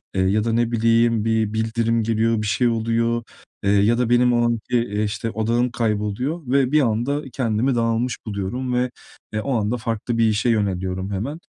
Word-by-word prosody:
eee, 95 - +2
ya 100 +3 +2
da 115 -1 -1
ne 120 0 +1
bileyim 115 -1 +2
bir 110 -1 +1
bildirim 115 +1 0
geliyor, 115 0 +1
bir 105 - -2
şey 120 +3 +2
oluyor, 115 +1 0 0.4
eee, 100 - +2
ya 105 +3 +3
da 125 -1 0
benim 120 0 +4
o 120 0 +2
anki, 120 +1 0 0.3
işte, 110 +2 -3
odağım 115 +3 0
kayboluyor 110 +8 -1
ve 135 0 +2
bir 155 -1 +4
anda 125 +5 0
kendimi 120 +1 0
dağılmış 115 +1 0
buluyorum 110 +5 -3
ve, 125 0 0 0.4
eee, 110 - -1
o 135 +2 -2
anda 110 +3 -1
farklı 115 +1 -3
bir 115 - +3
işe 110 +3 +1
yöneliyorum 95 -3 -1
hemen. 125 - -4
115 Hz, 180 wpm, -22 LUFS, 110-120 Hz, 0.4 s, benim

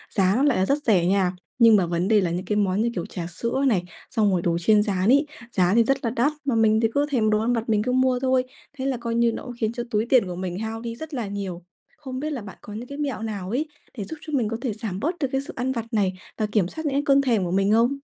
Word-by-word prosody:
giá 195 -1 +3
nó 265 - +2
lại 285 -7 +3
là 185 - +2
rất 285 +6 0
rẻ 190 -7 +3
nha, 185 -1 +2 0.3
nhưng 230 -2 +7
mà 190 -4 +3
vấn 170 +2 -1
đề 215 -2 +4
là 175 -2 0
những 180 +2 -3
cái 210 - -1
món 200 0 +1
như 235 - +1
kiểu 175 - -2
trà 170 -3 -6
sữa 235 +10 -2
này, 195 -8 +2 0.3
xong 210 -4 +2
rồi 180 - +1
đồ 170 -1 0
chiên 210 +4 +4
rán 195 0 0
ấy, 285 +3 +5 0.3
giá 185 -3 +2
thì 230 - +6
rất 270 +4 +2
là 230 - +2
đắt. 250 +6 +1
Mà 265 - +1
mình 220 -1 +4
thì 225 - +4
cứ 285 +1 +2
thèm 225 -5 +2
đồ 215 0 +3
ăn 235 +3 +1
vặt 230 0 -2
mình 210 -1 +2
cứ 250 - -1
mua 255 0 +2
thôi, 260 0 +2 0.3
thế 260 - -3
là 270 -2 0
coi 235 -1 -3
như 235 0 +3
nó - - -6
cũng 245 - -7
khiến 220 -1 0
cho 240 - -3
túi 215 +1 +1
tiền 245 -3 +4
của 180 - -5
mình 180 +1 -4
hao 225 +1 -4
đi 230 -1 -5
rất 315 +4 -8
là 240 -6 -2
nhiều. 195 -3 -5 0.3
Không 260 -3 -6
biết 305 +2 -3
là 260 - -4
bạn 200 -2 -10
có 205 - -10
những 235 +3 -6
cái 280 - -8
mẹo 280 -7 -3
nào 205 -4 -4
ấy 275 +8 -1 0.3
để 210 - -3
giúp 320 +10 -7
cho 310 - -8
mình 250 -6 +2
có 225 - -3
thể 245 -5 -2
giảm 210 -4 -5
bớt 330 - -1
được 275 - +1
cái 270 - 0
sự 310 +6 -9
ăn 255 +1 -1
vặt 230 -3 -3
này 195 -4 +2 0.2
và 215 - 0
kiểm 210 -4 +1
soát 315 - -7
những 285 - 0
cái 285 - +1
cơn 275 0 +5
thèm 235 -7 +1
của 175 - -2
mình 195 +2 +2
không? 235 +5 +3
225 Hz, 310 wpm, -24 LUFS, 195-255 Hz, 0.3 s, nhưng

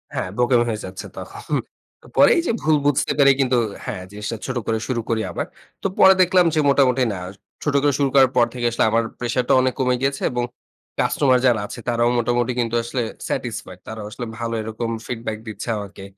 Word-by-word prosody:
হ্যাঁ - - -2
বোকামি 120 -1 +3
হয়ে 110 -1 -3
যাচ্ছে 95 0 -7
তখন। - - -8 0.7
পরেই 340 - +6
যে - - +2
ভুল 155 0 +3
বুঝতে 145 -2 +2
পারে 140 -1 +7
কিন্তু 130 -2 +2 0.3
হ্যাঁ 90 - -5
জিনিসটা 105 +2 -5
ছোট 130 -1 -3
করে 110 0 +1
শুরু 120 -3 -1
করি 110 -1 +1
আবার। - - -3 0.4
তো - - +2
পরে 190 0 +9
দেখলাম 180 0 +4
যে - - +3
মোটামুটি 130 -2 +3
না, 90 - -5 0.4
ছোট 145 - 0
করে 145 -1 +2
শুরু 140 -1 +2
করার 135 -2 +7
পর 120 - +6
থেকে 120 -1 -3
আসলে - - +1
আমার 115 0 +3 0.2
প্রেশারটা 120 +1 0
অনেক 130 0 +1
কমে 125 -1 +2
গিয়েছে 140 0 -1
এবং 125 0 -1 0.6
কাস্টমার 130 -3 +3
যারা 120 -4 +3
আছে 120 - -8
তারাও 120 0 +2
মোটামুটি 120 +1 +1
কিন্তু 115 -1 0
আসলে 120 +1 -2 0.3
স্যাটিসফাইড। - - -4
তারাও 110 -1 -6
আসলে 120 - -5
ভালো 115 0 -3
এরকম 110 +1 -4 0.2
ফিডব্যাক 115 -3 -4
দিচ্ছে 110 +1 -6
আমাকে 100 -1 -8
120 Hz, 195 wpm, -21 LUFS, 115-130 Hz, 0.7 s, পরে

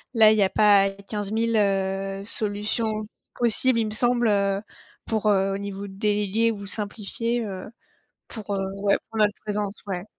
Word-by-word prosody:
là, 220 -1 +7
il 215 - +3
y - - +4
a 190 - +4
pas 200 -2 +5
15 200 +1 -6
000, 230 +1 0
heu, 195 -1 0
solutions 215 0 0 0.3
possibles 240 +1 +3
il 225 - +1
me 215 - -4
semble, 240 +1 +2
heu, 200 -1 +1 0.4
pour, 220 -1 -1
heu, 195 -1 +2
au 195 - -3
niveau 200 0 -6
déléguer 210 +2 0
ou 200 -2 -7
simplifier, 220 +3 -2
heu, 190 -2 -6 0.6
pour, 205 -2 -5
heu, 195 - -1 0.2
ouais 200 -1 +3
pour 225 - -5
notre 210 -1 +3
présence, 210 -1 -2
ouais. 185 -1 -4
205 Hz, 170 wpm, -24 LUFS, 195-220 Hz, 0.6 s, là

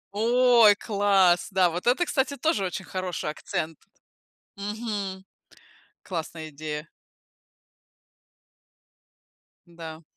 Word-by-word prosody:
Ой, 235 -1 +5
класс! 195 -5 +3
Да, 185 -3 +3
вот 175 +7 -5
это, 310 +9 +3
кстати, 280 -1 -1
тоже 240 -9 +1
очень 185 +1 -4
хороший 180 -5 -3
акцент! 155 0 -4 0.8
Мгм, 205 -2 -4 0.8
классная 160 -3 -5
идея. 150 +1 -6 2.8
Да. 165 -1 -10
190 Hz, 85 wpm, -26 LUFS, 165-220 Hz, 2.8 s, Ой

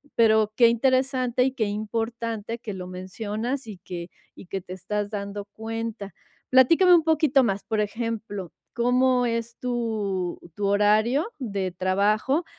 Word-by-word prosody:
Pero 220 -2 +4
qué 235 -1 +6
interesante 255 0 +2
y 265 - +1
qué 230 -5 -1
importante 225 +1 -3
que 210 -4 -6
lo 180 -1 -6
mencionas, 215 +7 -4
y 205 -4 -8
que 170 -1 -7 0.3
y - - -12
que 190 +2 -4
te 180 - -13
estás 205 +3 -3
dando 200 -1 -5
cuenta. 225 0 -6 0.4
Platícame 330 +8 +6
un 325 - +4
poquito 305 -4 +3
más. 200 -3 -1
Por 220 -2 0
ejemplo, 210 -4 -4 0.2
¿cómo 250 +1 +3
es 230 0 -2
tu 215 -7 -2 0.2
tu 205 -1 -1
horario 215 - +3
de 200 -7 -2
trabajo? 205 - +1
220 Hz, 145 wpm, -25 LUFS, 200-245 Hz, 0.4 s, qué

